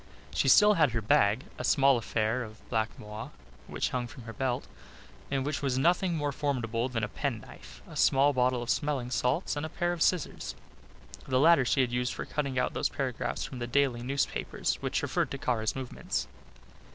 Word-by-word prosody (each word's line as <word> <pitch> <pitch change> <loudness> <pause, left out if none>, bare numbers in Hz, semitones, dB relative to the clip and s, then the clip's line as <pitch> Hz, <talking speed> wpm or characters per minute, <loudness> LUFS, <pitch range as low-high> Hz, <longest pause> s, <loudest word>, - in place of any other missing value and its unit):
She - - +1
still 210 0 +7
had 150 - +3
her 115 - 0
bag, 105 +3 +3 0.2
a - - -3
small 140 -1 +5
affair 115 +1 0
of 110 -2 -10
black 110 -1 +1
moire, 105 +1 -7 0.4
which - - -1
hung 125 -1 -2
from 130 -1 -11
her 115 0 -8
belt, 130 -2 -1 0.6
in 135 -1 0
which 145 +1 -2
was 135 -3 0
nothing 175 +4 +2
more 145 -1 -1
formidable 125 -4 -1
than 115 -3 -2
a - - +1
penknife, - - -6
a - - -11
small 140 +2 +4
bottle 125 -1 +1
of 120 - -1
smelling 140 -4 -1
salts 135 +9 0
and 145 - -3
a 155 - -3
pair 175 +2 -1
of 170 - -6
scissors. 180 -4 0 0.7
The 130 -1 +2
latter 160 -2 +6
she 135 - +3
had 125 -2 0
used 125 +1 -1
for - - -4
cutting 140 -3 -2
out 125 - +1
those - - 0
paragraphs 130 -4 -3
from 130 - -7
the 120 - -3
daily 130 -1 +1
newspapers 135 +3 -1
which - - -1
referred - - 0
to 140 - -4
Kara's 120 -6 -1
movements. 130 -2 -3
130 Hz, 195 wpm, -29 LUFS, 120-145 Hz, 0.7 s, still